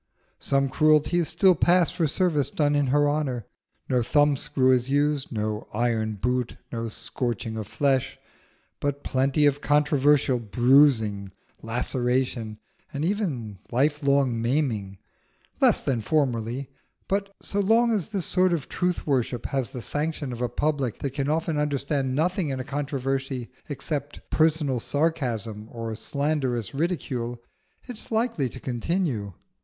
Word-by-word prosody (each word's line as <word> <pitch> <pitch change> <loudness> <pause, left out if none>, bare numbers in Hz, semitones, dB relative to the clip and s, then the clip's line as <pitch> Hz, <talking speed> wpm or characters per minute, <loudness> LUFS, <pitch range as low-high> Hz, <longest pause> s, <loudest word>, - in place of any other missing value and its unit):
Some 135 0 +1
cruelties 155 +4 +3
still 190 -3 +4
pass 175 +1 +3
for 165 -3 0
service 150 -2 +1
done 145 -1 +1
in 145 -1 +2
her 145 +3 +3
honour: 140 -6 -1 0.4
no 125 -1 +2
thumb 145 +4 +3
screw 130 -1 +2
is 125 0 +2
used, 145 0 +1
no 105 -2 -3
iron 110 -2 0
boot, 125 +4 -1
no 115 -1 -3
scorching 115 0 -3
of 110 -2 -5
flesh; 135 +1 0 0.6
but 145 0 -2
plenty 135 +3 +2
of 145 0 +2
controversial 145 -3 +3
bruising, 115 -3 +3 0.3
laceration, 120 -1 -1 0.3
and 145 +2 -2
even 145 - -2
lifelong 140 -2 +2
maiming. 115 -7 -1 0.6
Less - - +4
than 120 -4 0
formerly; 130 0 -1 0.4
but 200 0 -1
so 200 - -3
long 225 +4 +4
as 205 -4 -1
this 195 -5 -2
sort 185 -1 +2
of 155 -5 -2
truth 180 -1 -1
worship 125 -4 0
has 135 -3 -1
the 125 - -7
sanction 150 -3 -2
of 120 - -6
a 125 - 0
public 135 -2 -1
that 140 - -3
can 140 0 -1
often 160 0 0
understand 140 -2 -1
nothing 175 +2 0
in 135 -1 -3
a - - -3
controversy 135 -2 -3 0.2
except 145 0 -5
personal 155 -5 +2
sarcasm 120 -8 -1
or 115 -1 -5
slanderous 135 -5 -1
ridicule, 135 -7 -2 0.4
it 245 -4 -7
is - - -9
likely 220 - 0
to 130 - -9
continue. 125 - -2
135 Hz, 140 wpm, -25 LUFS, 120-150 Hz, 0.6 s, still